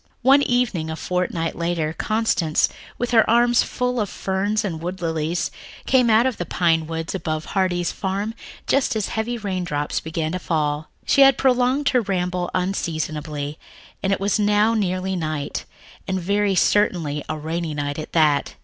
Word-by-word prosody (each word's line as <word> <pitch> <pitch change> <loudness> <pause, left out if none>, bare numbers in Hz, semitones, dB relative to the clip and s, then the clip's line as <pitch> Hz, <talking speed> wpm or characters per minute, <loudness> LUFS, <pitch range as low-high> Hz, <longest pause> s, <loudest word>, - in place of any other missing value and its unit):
One 270 +3 +6
evening 245 - 0
a 160 - -3
fortnight 175 -1 -2
later 170 -2 -1
Constance, 215 -7 +1 0.3
with 245 0 -2
her 225 -2 +4
arms 240 +1 +4
full 250 0 -1
of 210 -3 -1
ferns 200 +4 -1
and 165 -5 -4
wood 180 +3 -4
lilies, 165 0 -1 0.3
came 250 -3 +4
out 225 +2 +5
of 260 -4 0
the 175 - -3
pine 165 -3 +1
woods 165 0 -4
above 155 -4 -3
Heartsease 180 -3 +1
Farm 200 +3 -3 0.3
just 275 -4 +1
as 215 -2 -1
heavy 230 +2 -2
raindrops 180 -8 -2
began 160 0 -3
to 185 - -2
fall. 155 -3 -1 0.2
She 275 - +4
had 270 -1 +7
prolonged 260 +2 +2
her 250 -2 +3
ramble 180 -3 -1
unseasonably, 155 -5 -3 0.4
and 195 - 0
it 195 - +1
was 200 +2 +1
now 210 +2 +3
nearly 190 -3 -1
night, 155 -4 -3 0.4
and 190 -1 -1
very 200 +2 +1
certainly 165 -8 +2
a 155 - -2
rainy 160 +1 -3
night 145 0 -3
at 155 - -7
that. 150 -3 +2
185 Hz, 165 wpm, -22 LUFS, 160-215 Hz, 0.4 s, had